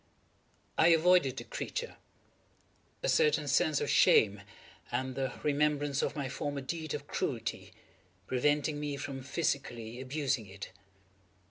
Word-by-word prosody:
I 160 - +7
avoided 165 -5 +4
the - - -4
creature; 480 -1 -5 1.1
a - - +1
certain 460 -2 +3
sense - - +3
of 450 - -1
shame, 450 -2 +5 0.5
and 130 +2 -1
the 130 -1 -2
remembrance 145 -1 +1
of - - -1
my 140 -3 -2
former 140 +1 -3
deed 155 +3 -4
of - - -6
cruelty, - - -3 0.5
preventing 145 +5 +1
me 145 -1 -3
from 135 -1 -5
physically 130 -5 -2
abusing 130 -4 -1
it. 95 0 -9
140 Hz, 125 wpm, -31 LUFS, 130-155 Hz, 1.1 s, I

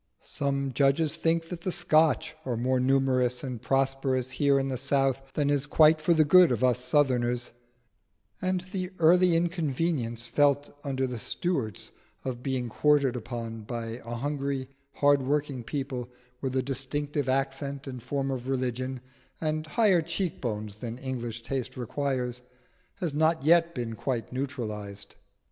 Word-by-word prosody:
Some 140 -1 -2
judges 140 +4 +3
think 165 0 +1
that 175 -2 -6
the 185 - -2
Scotch 160 -3 +3
are 125 -5 -2
more 130 +2 +1
numerous 130 -1 +2
and 125 -4 -5
prosperous 135 -1 0
here 140 +1 +3
in 135 0 0
the 135 - -2
South 135 -1 +1
than 145 -1 +2
is 145 0 +1
quite 155 +1 +5
for 170 +2 +3
the 155 -1 +5
good 180 +1 +7
of 120 0 0
us 125 -1 +2
Southerners; 125 -3 +1 0.9
and 185 -1 0
the 185 -3 -2
early 175 +2 +5
inconvenience 160 -8 -1
felt 145 +4 +2
under 135 -2 -1
the 125 -2 -4
Stuarts 130 - -2 0.3
of 125 -2 -3
being 130 -2 -2
quartered 140 +1 +2
upon 115 -1 -5
by 115 +2 -5
a 120 +1 -5
hungry, 140 0 -2 0.2
hard 145 -1 +4
working 140 -1 -1
people 130 -2 -4 0.3
with 130 -1 -2
a 130 - +2
distinctive 140 +1 -2
accent 135 +1 -1
and 130 -3 -7
form 135 +2 -2
of 130 -1 -4
religion, 130 0 -2 0.4
and 155 0 -1
higher 190 +1 +3
cheek 170 +1 -3
bones 105 -4 -4
than 115 +1 -6
English 120 -3 -5
taste 130 0 -4
requires, 125 0 -2 0.5
has 175 -7 -3
not 160 +1 +2
yet 170 +2 +4
been 120 -3 -3
quite 120 +1 -3
neutralised. 110 -7 -4
135 Hz, 150 wpm, -28 LUFS, 125-150 Hz, 0.9 s, good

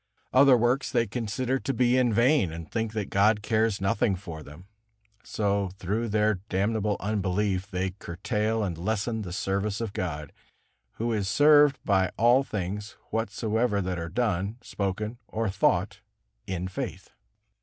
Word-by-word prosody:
Other 130 -1 +7
works 120 +4 +1
they 115 - +2
consider 125 +4 -2
to 135 - -2
be 125 0 +3
in 125 -2 +3
vain, 120 - +3
and 80 0 -7
think 115 +2 -2
that 105 -3 -3
God 105 +1 +3
cares 110 -1 +1
nothing 95 +1 +1
for 85 -4 -8
them. 75 +4 -12 0.6
So 100 -2 0
through 105 +5 -2
their 105 -1 +2
damnable 105 +2 0
unbelief 100 -1 -1
they 95 -1 -2
curtail 105 +5 -2
and 85 -5 -3
lessen 110 +4 -1
the 95 -4 -6
service 100 +2 -1
of 115 -4 -4
God, 75 -6 -4 0.6
Who 115 +1 -2
is 100 -3 -1
served 145 +3 +5
by 95 -3 +3
all 120 +4 +5
things 105 -3 -4 0.2
whatsoever 110 0 0
that 90 -2 -2
are 85 0 -4
done, 105 0 -1
spoken 105 +4 -3
or 110 -1 -2
thought 95 - +1 0.5
in 95 -1 -3
faith. 95 - -6
105 Hz, 150 wpm, -27 LUFS, 95-115 Hz, 0.6 s, Other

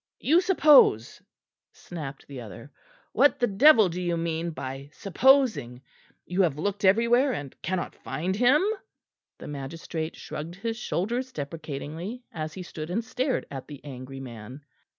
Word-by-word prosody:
"You 330 +5 +4
suppose!" 300 - +5 0.5
snapped 150 -5 -8
the 135 -3 -8
other. 115 +5 -11 0.4
"What 285 - +4
the 245 - +3
devil 230 0 +6
do 180 +1 -4
you 175 -1 -1
mean 165 0 -2
by 135 -2 -7
supposing? 210 - +2 0.4
You 180 +2 0
have 160 -6 +1
looked 200 +5 -2
everywhere 235 +7 +4
and 145 - -6
cannot 185 +1 -3
find 185 +4 -3
him?" 250 - +4 0.7
The - - -10
magistrate 160 +3 -5
shrugged 165 +3 -7
his 225 +4 -3
shoulders 240 +4 -2
deprecatingly, 155 - -6
as 155 -1 -5
he 185 - -6
stood 155 -2 -7
and 225 +6 -2
stared 255 +2 -1
at 135 -2 -7
the 145 -2 -9
angry 135 -1 -8
man. 125 +2 -10
170 Hz, 145 wpm, -26 LUFS, 145-235 Hz, 0.7 s, devil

